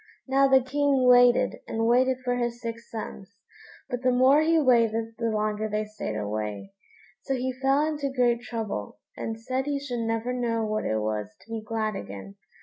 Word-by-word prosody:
Now 275 +1 +4
the 265 -1 +5
King 275 -1 +2
waited 245 0 +5
and 225 0 -1
waited 255 +2 +3
for 245 0 +1
his 240 -1 -2
six 230 -1 -7
sons, 200 -3 -8 0.5
but 245 0 -4
the 255 - +2
more 260 +4 +5
he 325 +1 +3
waited, 230 -4 +2
the 230 -1 0
longer 215 0 -1
they 215 +1 -1
stayed 210 - -5
away; 105 - -4 0.5
so 270 - -2
he 255 0 -2
fell 270 +3 +2
into 295 -3 -2
great 240 -2 +2
trouble, 220 - -5 0.2
and 225 0 -5
said 260 +4 -2
he 290 -1 0
should 255 -4 -4
never 225 +2 -1
know 230 -2 -1
what 215 0 -2
it 110 - 0
was 105 -1 -2
to 225 - -17
be 225 -1 -3
glad 215 -1 -2
again. 100 - -8
235 Hz, 185 wpm, -26 LUFS, 215-260 Hz, 0.5 s, the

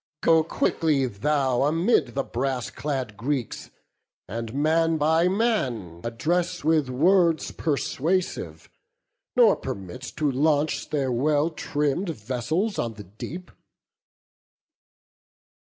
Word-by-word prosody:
Go 160 -1 +5
quickly 155 -3 +1
thou 130 +3 0
Amid 155 - +2
the 135 - 0
brass 130 0 -2
clad 130 -7 -3
Greeks, 125 +1 -3 0.6
and 115 +1 -5
man 160 +4 +2
by 160 +3 +3
man 130 - -1
Address 175 +10 -1
with 155 -3 +2
words 165 +4 +3
persuasive, 165 +4 -2 0.7
nor 235 -5 +6
permit 100 -4 -7 0.2
To 150 -2 +1
launch 145 +2 +1
their 135 -4 0
well 145 +6 +2
trimm'd 150 +4 -1
vessels 150 - -2
on 115 -2 -2
the 105 - -9
deep." 135 - -8
145 Hz, 105 wpm, -25 LUFS, 125-165 Hz, 0.7 s, nor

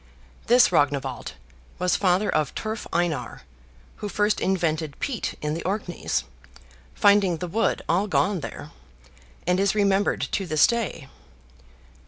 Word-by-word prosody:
This 245 +1 +6
Rognwald 140 -3 0 0.4
was 180 0 +1
father 190 +2 +2
of 155 - 0
Turf 220 +1 -4
Einar, 170 -3 -2 0.5
who 210 - -5
first 210 +1 +1
invented 160 -5 -1
peat 265 -6 -3
in 150 0 -1
the 165 - -4
Orkneys, 190 -2 -2 0.7
finding 200 -4 +4
the 180 - -4
wood 225 +7 0
all 185 +5 +1
gone 195 0 +1
there; - - -8 0.7
and 180 +1 +2
is 200 +1 +2
remembered 200 -1 +2
to 195 - -1
this 155 -2 +5
day. 230 - -2
185 Hz, 130 wpm, -25 LUFS, 165-205 Hz, 0.7 s, This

